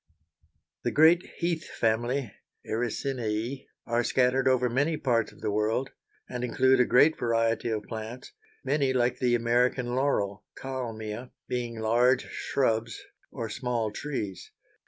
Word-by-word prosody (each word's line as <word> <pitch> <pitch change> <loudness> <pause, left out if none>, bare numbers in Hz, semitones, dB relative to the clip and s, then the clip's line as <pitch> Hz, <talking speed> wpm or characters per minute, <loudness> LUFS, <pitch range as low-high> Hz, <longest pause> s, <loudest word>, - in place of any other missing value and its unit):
_ - - -64 0.8
The - - +1
great 165 +4 +5
heath 170 -2 -1
family 120 +1 0 0.3
(Ericineæ) 120 +1 -2 0.2
are 120 +1 +1
scattered 130 +2 +2
over 130 -1 +3
many 145 +6 +1
parts 120 -6 +1
of - - -19
the - - -1
world, 110 +5 0 0.4
and 125 -1 -5
include 130 +2 +3
a 125 - +5
great 145 +7 +4
variety 115 -1 +1
of 110 -2 -2
plants, 115 +3 -7 0.3
many 140 -3 +1
like 125 -1 +1
the 120 -1 +3
American 120 +1 +1
laurel 105 -7 0
(Kalmia) 120 -3 -5 0.2
being 120 -2 -3
large 120 +3 +3
shrubs 115 -3 -1 0.3
or 115 - -4
small 115 -1 -2
trees. 105 - -5
120 Hz, 135 wpm, -28 LUFS, 115-130 Hz, 0.8 s, great